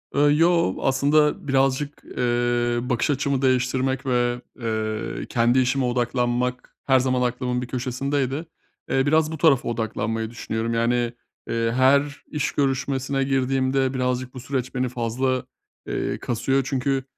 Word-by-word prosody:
Iıı, 145 +1 +4
yoo. 165 - +3
Aslında 145 +2 +2
birazcık, 135 +2 0
eee, 120 -1 +1
bakış 125 +2 0
açımı 140 -1 0
değiştirmek 130 0 +1
ve, 120 -1 +1 0.2
eee, 110 -1 -3
kendi 120 +2 +3
işime 130 +1 +1
odaklanmak 125 0 -1
her 130 -1 +5
zaman 130 0 +1
aklımın 125 0 -1
bir 125 - -5
köşesindeydi. 135 +4 -2 0.4
Eee, 135 +1 +2
biraz 155 +1 +3
bu 160 - -4
tarafa 140 -7 +3
odaklanmayı 110 -1 -2
düşünüyorum, 115 0 -3
yani, 120 +1 +1 0.4
eee, 115 0 0
her 140 +3 +2
iş 150 - -2
görüşmesine 135 0 0
girdiğimde 135 0 +1
birazcık 125 0 -1
bu 130 - -7
süreç 130 +1 -3
beni 125 0 0
fazla, 125 +2 -1 0.4
eee, - - -2
kasıyor. 125 +3 0
Çünkü, 135 0 0
130 Hz, 135 wpm, -23 LUFS, 120-135 Hz, 0.4 s, her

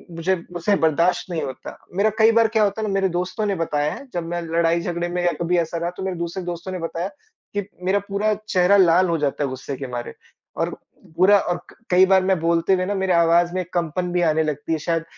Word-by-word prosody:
मुझे 180 +3 +1 0.2
मुझसे 175 +4 +1
बर्दाश्त 170 +3 +1
नहीं 165 - -2
होता। 130 -1 -7 0.2
मेरा 205 +3 +3
कई 220 +1 +6
बार 225 0 +4
क्या 215 - +5
होता 205 +2 0
है 215 - -1
ना 195 - -2
मेरे 195 -1 +1
दोस्तों 180 +5 -2
ने 200 -1 0
बताया 150 -3 -1
है 280 - -10
जब 175 -1 -2
मैं 175 0 -3
लड़ाई-झगड़े 170 +1 0
में 175 0 -2
या 175 - +3
कभी 175 +1 +1
ऐसा 170 0 -1
रहा 170 +1 -2
तो 190 - -5
मेरे 185 -2 -3
दूसरे 170 +2 -4
दोस्तों 175 +1 -5
ने 185 - -4
बताया 165 +2 -3 0.5
कि 200 - -1 0.2
मेरा 195 +2 +2
पूरा 210 +2 +1 0.2
चेहरा 185 +2 +4
लाल 180 0 +5
हो 165 - +1
जाता 145 0 -1
है 135 - -1
गुस्से 130 +2 -6
के 135 - -5
मारे 120 -1 -5 0.4
और - - 0 0.5
पूरा 200 +3 +6
और 175 -2 -1
क - - -17
कई 185 +1 +6
बार 190 0 +4
मैं 190 -2 +1
बोलते 170 +3 +2
हुए 185 0 +1
ना 205 - -1
मेरी 190 -1 0
आवाज़ 170 +1 +3
में 185 0 -1
कंपन 175 +1 -1
भी 175 0 +1
आने 160 -1 +2
लगती 150 +1 -3
है 160 - -1
शायद, 165 +1 -1
175 Hz, 240 wpm, -22 LUFS, 165-190 Hz, 0.5 s, कई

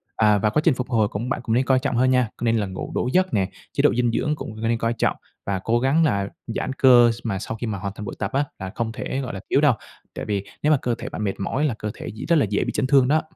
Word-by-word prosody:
à, 105 -2 +4
và 105 +2 +2
quá 150 - +1
trình 165 - +5
phục 125 0 -4
hồi 110 -4 +2
cũng 110 +5 -4
bạn - - -1
cũng 115 -2 0
nên 130 +2 +2
coi 130 0 +3
trọng 130 -1 -2
hơn 130 +2 +3
nha, 125 -3 +2
nên 115 -1 +2
là 105 - 0
ngủ 95 0 -6
đủ - - 0
giấc 185 -3 +2
nè. 95 -4 +1 0.2
Chế - - +1
độ - - +4
dinh 120 0 +1
dưỡng 150 +6 0
cũng 110 -6 -8
nên 115 +1 +1
coi 115 +1 0
trọng 115 - 0 0.3
và 100 -1 -1
cố 120 +1 +2
gắng 135 +6 +3
là 100 -7 +1 0.2
giãn 120 +3 -3
cơ 125 -3 +6
s 115 - -6
mà 100 -5 -2
sau 110 +2 -5
khi 120 - -4
mà 105 -2 -2
hoàn 100 +1 -5
thành 105 - -7
buổi - - -6
tập 100 +1 -2
á 140 +2 +2
là 95 -1 -5
không 115 -1 -2
thể 130 +2 -4
gọi 125 - -5
là 95 - -5
thiếu 140 - +3
đâu, 145 -4 +5 0.4
tại - - -5
vì 100 -2 -2 0.2
nếu 150 - +4
mà 150 - +5
cơ 120 -1 0
thể 125 - -7
bạn 105 - -5
mệt 100 -2 -2
mỏi 130 +9 -1
là 140 - +1
cơ 105 - -3
thể - - -8
dị 110 - -6
rất 170 - +3
là 150 - +4
dễ 105 - +1
bị - - -2
chấn 130 - 0
thương 135 -2 +5
đó. 155 +3 +3
120 Hz, 320 wpm, -23 LUFS, 105-130 Hz, 0.4 s, cơ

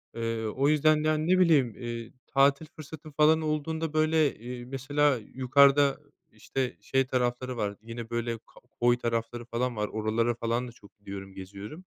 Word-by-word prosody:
Eee, 115 -1 -2
o 135 +6 0
yüzden 155 0 +3
yani 155 0 +1
ne 185 +1 +4
bileyim, 140 - +4
eee, 120 -2 -6
tatil 140 +2 +3
fırsatım 155 0 -10
falan 155 +2 +4
olduğunda 155 +1 -2
böyle, 155 -1 +2
eee, 120 +2 -8
mesela 135 +2 +1
yukarıda 140 +4 +3 0.3
işte 125 +4 -4
şey 135 0 +1
tarafları 125 0 -1
var 100 -2 -2
yine 115 0 -8
böyle 120 0 -2
k 110 - -28 0.4
koy 120 0 +4
tarafları 115 0 -3
falan 120 +1 -2
var, 105 0 -1
oralara 110 +2 0
falan 120 +2 -1
da - - -9
çok 105 -3 -19
gidiyorum 100 -1 -8
geziyorum. 100 - -9
125 Hz, 160 wpm, -28 LUFS, 115-150 Hz, 0.4 s, ne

